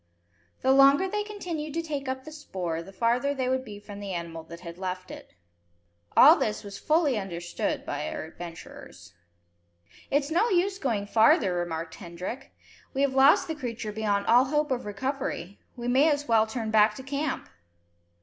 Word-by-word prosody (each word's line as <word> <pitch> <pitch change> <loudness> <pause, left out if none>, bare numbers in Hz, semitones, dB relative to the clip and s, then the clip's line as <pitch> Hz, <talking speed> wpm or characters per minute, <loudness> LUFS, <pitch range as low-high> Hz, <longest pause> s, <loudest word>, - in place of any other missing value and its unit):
The 265 - +4
longer 275 +6 +6
they 420 +2 -1
continued 345 -8 -5
to 330 - -1
take 290 -4 -4
up 260 0 -3
the 310 - -10
spoor, 185 - -4
the 190 - -11
farther 245 +7 +1
they 260 -2 -1
would 260 0 0
be 210 -5 -9
from 205 0 -10
the 200 -2 -5
animal 170 -1 -5
that 170 +1 -11
had 170 0 -9
left 185 -1 -5
it. - - -11 0.8
All - - +10
this 105 - -2
was 200 -1 -8
fully 305 -7 +2
understood 175 -3 -3
by - - -3
our - - -5
adventurers. 165 - -11 1.0
"It's 285 +2 0
no 395 +9 +3
use 385 0 +1
going 225 -7 -1
farther," 210 -2 +4
remarked 165 -2 -3
Hendrik. 180 +11 -7 0.4
"We 275 - +2
have 275 -1 +1
lost 270 +2 +5
the 320 - -2
creature 240 -7 -5
beyond 205 -1 -1
all 245 +3 +5
hope 295 +1 0
of 250 -3 -1
recovery. 205 -4 -4 0.2
We 240 -1 -5
may 270 +6 +4
as 290 -1 -1
well 220 -1 +4
turn 220 -1 -4
back 215 0 +5
to 265 - -8
camp." 280 +1 -3
240 Hz, 180 wpm, -27 LUFS, 195-285 Hz, 1.0 s, All